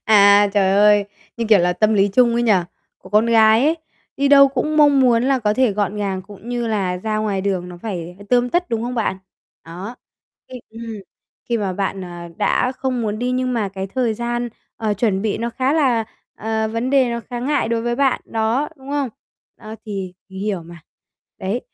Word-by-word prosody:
À, 205 -1 +6
trời 195 -2 +3
ơi! 205 0 +5 0.3
Như, 235 - -2
kiểu, 215 -2 +6
là 180 0 +2
tâm 215 +4 +2
lý 200 0 +3
chung 235 +3 +3
ấy 235 - +1
nhỉ? 230 -2 +4 0.5
Của - - -15
con 215 +2 +3
gái 225 +1 +5
ấy, 320 +2 +2 0.4
đi 280 0 +1
đâu 275 -1 +7
cũng 275 +3 -2
mong 290 -2 +5
muốn 240 -3 +4
là 265 +1 +2
có 210 -3 0
thể 255 -3 +2
gọn 205 +1 -1
gàng 195 -2 -2
cũng 205 +4 -13
như 240 -1 -2
là 195 -5 -1
ra 215 +3 -3
ngoài 210 -3 -1
đường 190 -2 -2
nó 175 - -9
phải, 180 -5 -5
ờ, 200 - -12
tươm 245 0 +3
tất, 350 +7 0
đúng 230 -1 -2
không 245 +1 -3
bạn? 220 -5 -1 0.5
Đó, 185 +8 -8 0.5
thì 255 -1 -8
ừm, 225 0 -7 0.5
khi 235 -1 +1
mà 200 -3 -2
bạn, 195 +1 -3
ờ, 180 - -7 0.3
đã 250 - +1
không 255 -2 -2
muốn 215 -1 -2
đi 245 +2 -1
nhưng 255 0 -1
mà 220 -4 -1
cái 190 0 -5
thời 230 +2 -1
gian, 240 +1 -2 0.3
ờ, 215 -2 -1
chuẩn 200 -2 0
bị 215 -2 -1
nó 235 +1 -2
khá 260 +3 0
là 260 -8 +2 0.3
ờ, 220 0 -2
vấn 230 +3 -2
đề 265 -3 +3
nó 235 0 -3
khá 240 -1 -4
ngại 285 -1 0
đối 230 0 -1
với 240 0 -1
bạn, 270 -1 +2
đó, 225 +6 -1
đúng 270 0 -11
không? 285 -2 -1 0.5
Ơ, 215 -1 -9
thì 195 -3 -5
mình 190 0 -9
hiểu 200 -4 -2
mà, 170 +1 -12 0.6
đấy, 200 +6 -2
225 Hz, 220 wpm, -20 LUFS, 200-245 Hz, 0.6 s, đâu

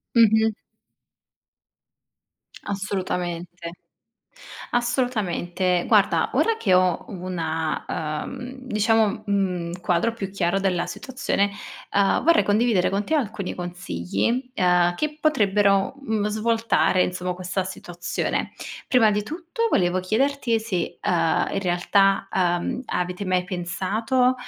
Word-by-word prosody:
Mh-mh. 220 -1 +5 2.1
Assolutamente. 180 -3 -3 1.0
Assolutamente. 200 -8 0
Guarda, 205 -3 +3
ora 455 -1 +2
che 190 - +2
ho 180 -1 +2
una, 165 -4 -3 0.4
uhm, 250 +2 -7
diciamo, 215 -2 +1
mhmm, 180 -3 -1
quadro 175 +5 +1
più 210 -4 -5
chiaro 195 -1 +1
della 185 -3 0
situazione, 255 -6 -1 0.4
uhm 200 -1 +3
vorrei 335 +1 +5
condividere 210 -2 +2
con 200 +1 -1
te 315 - -1
alcuni 215 -9 -2
consigli, 180 +8 -2
uhm, 180 -1 +3
che 305 +4 -2
potrebbero, 205 -7 +2
mhmm, 220 -6 -1
svoltare 220 -3 +2
insomma 180 0 -3
questa 185 +1 -2
situazione. 175 -2 -3 0.4
Prima 230 -4 +5
di 210 0 0
tutto 340 - -3
volevo 180 0 +2
chiederti 235 +4 +1
se, 195 -6 -3
uhm, 165 -2 +1
in 195 - -1
realtà, 195 +2 +2
uhm, 180 +7 0
avete 180 +2 -2
mai 185 -1 +1
pensato, 200 +8 0
195 Hz, 110 wpm, -24 LUFS, 180-230 Hz, 2.1 s, Mh-mh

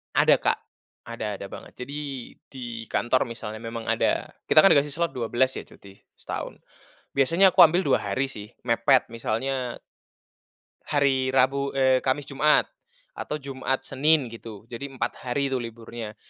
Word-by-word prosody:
Ada, - - +6
Kak, - - +2 0.5
ada 110 -3 -4
ada 100 - -6
banget. - - -10
Jadi 145 +3 -6 0.5
di 120 -4 -6
kantor 125 +2 +2
misalnya 115 -3 -7
memang 115 0 -6
ada, - - +1 0.2
kita - - +5
kan 175 - +8
dikasih 145 +1 +2
slot 170 +3 -2
12 125 +2 +1
ya - - -5
cuti 100 -1 -16 0.2
setahun. - - -6 0.5
Biasanya 165 +8 +4
aku 185 - -3
ambil 175 +2 +6
2 140 - +3
hari 105 +7 -1
sih 105 -3 -8 0.2
mepet 125 +3 +3
misalnya 120 +2 -2 1.1
hari 135 -2 +2
Rabu 135 +1 +2
eee, 130 -1 +4
Kamis, 135 +2 0
Jumat, 150 +2 +3 0.5
atau 150 - -4
Jumat, 135 -2 -3
Senin 150 -1 +2
gitu. 110 -2 -10
Jadi 140 +4 -5
4 135 -2 -3
hari 135 +2 -1
tuh 130 - 0
liburnya, 115 -1 -8
130 Hz, 150 wpm, -25 LUFS, 115-140 Hz, 1.1 s, kan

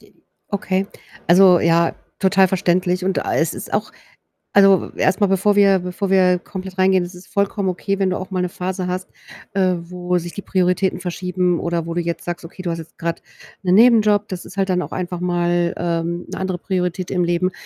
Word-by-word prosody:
D - - -23 0.3
okay. 195 -1 -1 0.4
Also, 180 0 +6
ja, 170 0 +2 0.2
total 190 -1 +4
verständlich. 180 0 0
Und 190 0 0
a - - -1
es - - +1
ist - - -8
auch - - -1 0.6
also, 195 -1 +5
erst 190 +2 +1
mal, 200 - +4
bevor 195 +2 +2
wir 200 -1 +5
bevor 180 +2 -4
wir 180 -2 +4
komplett 190 0 -8
reingehen, 190 -1 +3
es 175 +1 -9
ist 180 +1 -14
vollkommen 200 0 -1
okay, 195 +2 -2
wenn 190 -1 +2
du 185 - -1
auch 185 +1 -7
mal 185 -1 0
'ne 180 - -1
Phase 180 +1 -4
hast, 185 +1 -4 0.5
äh, 185 -2 +2
wo 180 +1 -2
sich 175 0 -7
die 200 - -7
Prioritäten 185 0 0
verschieben 180 0 -1
oder 170 -1 -2
wo 165 - -4
du 175 - 0
jetzt 170 0 -4
sagst: 175 0 -5
„Okay, 170 +3 -12
du 175 - -2
hast 165 - -4
jetzt 160 - -14
grad 165 0 -3 0.4
'nen 185 -1 +3
Nebenjob.“ 215 -3 +5
Das 185 -2 -6
ist 195 - -12
halt 195 0 0
dann 180 -1 +1
auch - - -7
einfach 180 -1 -4
mal, 175 -1 0
ähm, 170 0 -2
'ne - - -4
andere 190 -1 -2
Priorität 180 -1 -2
im 180 - +1
Leben, 175 +2 0
185 Hz, 210 wpm, -20 LUFS, 175-190 Hz, 0.6 s, Also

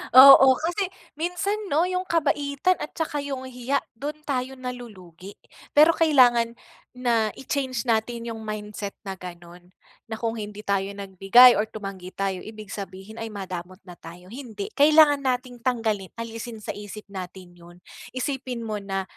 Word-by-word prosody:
Oo, 265 0 +10
kasi 350 +6 -1 0.3
minsan 360 +5 -1
'no, 315 +2 +2
yung 365 0 -2
kabaitan 295 +1 +1
at - - -7
tsaka 305 -2 -2
yung 275 -2 -4
hiya, 260 +2 -2
do'n 285 +6 -5
tayo 265 -2 -2
nalulugi. 210 -8 -9 0.4
Pero 305 +3 +8
kailangan 245 -8 +4 0.4
na 235 -3 +1
i-change 265 -3 -2
natin 230 +1 -1
yung 225 - -7
mindset 210 -1 -5
na 195 - -5
gano'n. 175 0 -11 0.4
Na 220 - -3
kung 230 0 -3
hindi 210 0 -7
tayo 195 -1 0
nagbigay 200 +6 +6
or 215 - 0
tumanggi 195 -4 -7
tayo, 195 -2 -2
ibig 215 -2 -10
sabihin 200 +2 -8
ay 225 - -4
madamot 185 -3 -7
na 180 - -10
tayo, 170 +2 -12
hindi. 230 -6 -7
Kailangan 295 -1 +6
nating 250 -2 -2
tanggalin, 225 -6 -1
alisin 230 0 -6
sa - - -3
isip 205 +1 -9
natin 180 -2 -9
'yon. 175 +1 -15 0.4
Isipin 255 -2 -3
mo 215 -2 -3
na 195 -1 -3
230 Hz, 150 wpm, -25 LUFS, 195-270 Hz, 0.4 s, Oo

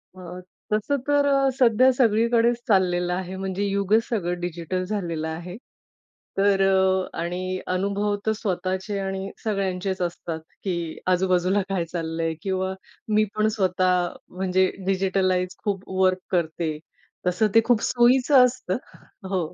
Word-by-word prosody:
अ, 180 0 -9 0.3
तसं 215 +7 +1
तर 290 0 +3
अ, 275 -1 +3
सध्या 255 +1 +5
सगळीकडेच 235 0 +3
चाललेलं 180 -3 +2
आहे, 185 +1 -4
म्हणजे 190 +1 -3
युगच 200 +2 +2
सगळं 180 -6 -1
डिजिटल 175 +1 -3
झालेलं 170 -6 -3
आहे. 170 +3 -6 0.8
तर 195 0 +3
अ, 190 -1 +2
आणि 185 +2 -3
अनुभव 200 +3 0
तर 220 - +3
स्वतःचे 190 0 -2
आणि 195 0 -3
सगळ्यांचेच 190 -3 -2
असतात, 170 -2 -3 0.2
की 190 -3 -1 0.3
आजूबाजूला 185 +1 +2
काय 185 -3 -1
चाललं 165 -1 -4
आहे 165 0 0
किंवा 190 0 -1 0.4
मी 215 - +5
पण 215 0 +2
स्वतः 180 -2 +1 0.2
म्हणजे 185 0 +1 0.2
डिजिटलाईज 185 -1 +1
खूप 200 -3 -3
वर्क 185 0 +3
करते, 160 -3 -1 0.5
तसं 180 +5 +2
ते 225 - +8
खूप 240 -3 +3
सोयीचं 250 +2 +5
असतं. 245 -6 -2 0.5
हो. 180 -4 -2
190 Hz, 130 wpm, -24 LUFS, 180-210 Hz, 0.8 s, ते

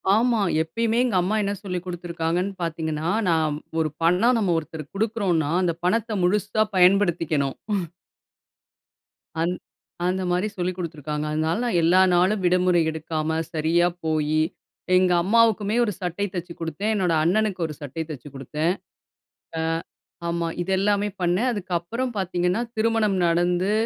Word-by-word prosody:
ஆமா. 230 -1 +2 0.2
எப்பயுமே 225 +7 -1
எங்க 230 -6 0
அம்மா 190 +5 0
என்ன 200 0 -1
சொல்லிக் 180 -3 -4
குடுத்திருக்காங்கன்னு 175 +1 -2
பாத்தீங்கன்னா, 160 -1 -2 0.2
நான் 155 -3 +1 0.2
ஒரு 155 -1 +1
பணம், 185 +9 +4
நம்ம 190 -5 +1
ஒருத்தருக்கு 155 0 -7
குடுக்குறோம்ன்னா, 195 -9 0
அந்த 175 -2 +1
பணத்தை 225 +3 +1
முழுசா 210 +3 +2
பயன்படுத்திக்கணும். 175 -7 +3 1.8
அந் 170 +2 +1 0.5
அந்த 185 +1 0
மாரி 180 +4 +1
சொல்லிக் 180 0 -2
குடுத்துருக்காங்க. 150 -3 -4
அதனால 160 +4 0
நான் 230 -7 +1
எல்லா 180 +3 +5
நாளும் 185 +4 +3
விடுமுறை 180 -1 +3
எடுக்காம, 160 0 -2
சரியா 165 +2 +2 0.2
போயி, 155 -1 +1 0.5
எங்க 185 0 +4
அம்மாவுக்குமே 220 +1 +3
1 210 - -2
சட்டை 180 +3 -2
தச்சு 175 -1 -5
குடுத்தேன். 165 +6 -2
என்னோட 180 -4 +1
அண்ணனுக்கு 190 +2 +1
ஒரு 155 - -6
சட்டைய 145 +3 -4
தச்சு 145 0 -8
குடுத்தேன். 150 +6 -1 0.9
அ - - 0 0.7
ஆமா. 170 0 -1
இத 175 - -4
எல்லாமே 205 +1 +2
பண்ணேன். 180 +8 +2
அதுக்கப்புறம் 200 +6 -2
பாத்தீங்கன்னா, 180 +1 0
திருமணம் 220 -3 +1
நடந்து, 175 +3 +2
180 Hz, 130 wpm, -24 LUFS, 160-200 Hz, 1.8 s, எல்லா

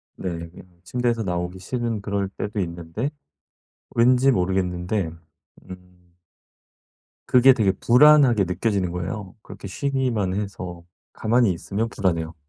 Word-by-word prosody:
네 85 -2 -5
그냥 90 0 -17
침대에서 120 +3 -1
나오기 90 0 -3
싫은 115 +1 -3
그럴 100 -1 -2
때도 105 +1 -5
있는데 85 - -3 0.9
왠지 125 +3 +4
모르겠는데 90 -1 -1 0.6
음 90 -1 -14 1.1
그게 130 +1 +6
되게 105 -6 +2
불안하게 125 +1 +5
느껴지는 95 0 -1
거예요. 95 +2 -5
그렇게 100 - -10
쉬기만 120 -5 -1
해서 95 -4 -5 0.3
가만히 115 -1 +2
있으면 105 +6 -3
불안해요. 85 -6 -1
95 Hz, 290 characters per minute, -23 LUFS, 90-115 Hz, 1.1 s, 그게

